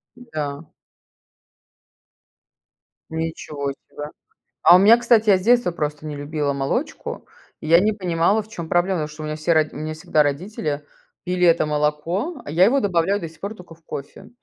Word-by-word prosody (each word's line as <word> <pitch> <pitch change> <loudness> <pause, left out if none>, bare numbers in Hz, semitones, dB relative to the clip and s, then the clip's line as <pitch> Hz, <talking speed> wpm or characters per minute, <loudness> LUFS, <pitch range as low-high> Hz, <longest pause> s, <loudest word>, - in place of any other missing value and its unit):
Да. 155 -11 -6 2.4
Ничего 160 -3 -4
себе. 145 +2 -9 0.5
А 175 - +9
у 180 - +7
меня, 215 +4 +7
кстати, 235 -2 +3
я 195 - +7
с 185 - -6
детства 240 -3 +3
просто 150 -2 -4
не 150 - -5
любила 145 0 -2
молочку. 135 0 -3 0.3
И 155 - -8
я 170 +2 +7
не 215 +3 +2
понимала, 185 +2 +1
в 210 - -15
чём 170 -7 -7
проблема, 180 +2 +2
потому 150 - -2
что 155 +1 -11
у - - -4
меня 155 0 -3
все 155 +2 +1
роди 155 -1 +3
у 145 - -6
меня 155 0 -4
всегда 155 -1 +1
родители 150 0 -3 0.4
пили 180 0 +1
это 165 -2 +4
молоко, 155 - -1
а - - -9
я 175 +4 +5
его 275 +6 +3
добавляю 195 -1 +1
до 165 -5 -6
сих 160 - -20
пор 200 +2 -5
тока 180 -5 -14
в 165 - -30
кофе. 140 0 -8
165 Hz, 185 wpm, -22 LUFS, 150-195 Hz, 2.4 s, А